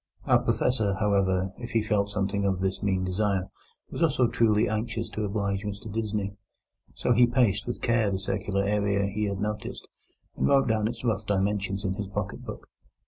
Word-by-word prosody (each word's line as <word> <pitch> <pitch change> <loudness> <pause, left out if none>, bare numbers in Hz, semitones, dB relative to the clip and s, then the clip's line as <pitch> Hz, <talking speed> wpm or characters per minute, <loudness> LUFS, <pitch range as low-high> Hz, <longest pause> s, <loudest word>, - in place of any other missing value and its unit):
Our - - +5
Professor, 110 -6 +1
however, 95 -2 +1
if 120 +1 -7
he 115 -1 +2
felt 105 -2 +1
something 100 0 -1
of 95 -2 +1
this 95 0 -1
mean 95 -2 +1
desire, 95 0 0 0.4
was - - -5
also 135 -7 +3
truly 115 -1 +3
anxious 110 +1 -2
to 110 - -3
oblige 100 -1 -1
Mr 105 0 -6
Disney. 105 -3 -2 0.6
So 125 - +2
he 120 +1 +6
paced 120 -4 +2
with 120 - -4
care 115 -3 +3
the 95 - -1
circular 100 0 -1
area 100 0 +1
he 105 +2 -1
had 100 -1 -2
noticed, 105 0 -4 0.5
and - - +1
wrote 135 -2 +4
down 110 -2 +2
its 115 +1 -5
rough 110 -4 -1
dimensions 100 0 0
in 95 - 0
his 105 0 -4
pocket 100 - -4
book. - - -8
105 Hz, 185 wpm, -27 LUFS, 100-110 Hz, 0.6 s, he